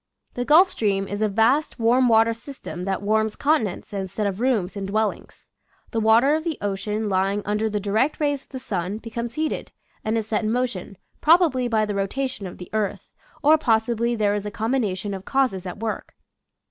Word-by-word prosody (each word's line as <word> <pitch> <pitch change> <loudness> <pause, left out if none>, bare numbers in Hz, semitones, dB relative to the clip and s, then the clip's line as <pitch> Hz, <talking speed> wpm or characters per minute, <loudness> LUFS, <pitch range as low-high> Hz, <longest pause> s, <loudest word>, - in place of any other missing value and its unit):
The 245 - -3
Gulf 350 +7 +6
Stream 195 -3 0
is 205 +1 -4
a 215 - +2
vast 230 +9 +2
warm 245 +2 +3
water 225 0 +4
system 230 -6 -8
that 195 0 -2
warms 220 +1 +1
continents 260 - 0
instead 195 +1 -3
of 200 +1 -2
rooms 220 -8 +1
in 195 -1 -4
dwel 215 +2 +2
lings - - -13 0.4
The 230 - 0
water 225 +6 +5
of 315 0 0
the 325 -3 -2
ocean 210 +2 -2
lying 195 +1 0
under 210 +2 0
the 210 0 -1
direct 215 +8 0
rays 290 -2 0
of - - -23
the 265 - -6
sun 195 -5 -3
becomes 235 +1 -5
heated 310 0 -2 0.3
and 220 +1 0
is 220 - -1
set 220 0 0
in 215 - 0
motion, 235 -6 -2 0.2
probably 310 -6 +4
by 220 -2 +2
the 210 - -3
rotation 205 +2 -2
of 180 - -10
the 180 - -10
earth, 205 -3 -2 0.3
or 310 +2 +6
possibly 235 -2 +1
there 210 -2 +1
is 205 0 -2
a - - -2
combination 210 -3 -1
of 190 -1 -6
causes 245 -8 0
at 180 - -6
work. 220 -1 -4
220 Hz, 200 wpm, -23 LUFS, 200-250 Hz, 0.4 s, Gulf